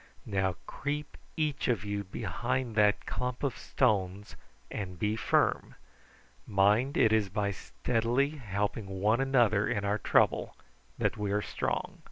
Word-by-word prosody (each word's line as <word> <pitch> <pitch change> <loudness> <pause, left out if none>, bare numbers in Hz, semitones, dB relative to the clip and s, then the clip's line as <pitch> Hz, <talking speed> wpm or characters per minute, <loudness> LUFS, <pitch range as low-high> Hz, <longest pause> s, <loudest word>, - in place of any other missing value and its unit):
Now 95 -3 0
creep 145 +1 -4 0.2
each 150 -3 0
of 115 -4 0
you 100 0 -2
behind 115 +5 -2
that 105 -1 +3
clump 125 +1 -3
of 140 - 0
stones 100 -5 0 0.4
and 90 -3 -5
be 105 +4 0
firm. 110 - +1 0.7
Mind 105 +7 +3
it 110 -1 +5
is 105 -3 +2
by 100 +1 -1
steadily 120 +7 0
helping 105 -6 -3
one 110 +6 +3
another 120 -7 +3
in 105 -3 -1
our 105 +1 +1
trouble - - +2 0.4
that - - 0
we 105 -1 -1
are 105 0 +1
strong." - - -3
105 Hz, 140 wpm, -30 LUFS, 100-125 Hz, 0.7 s, it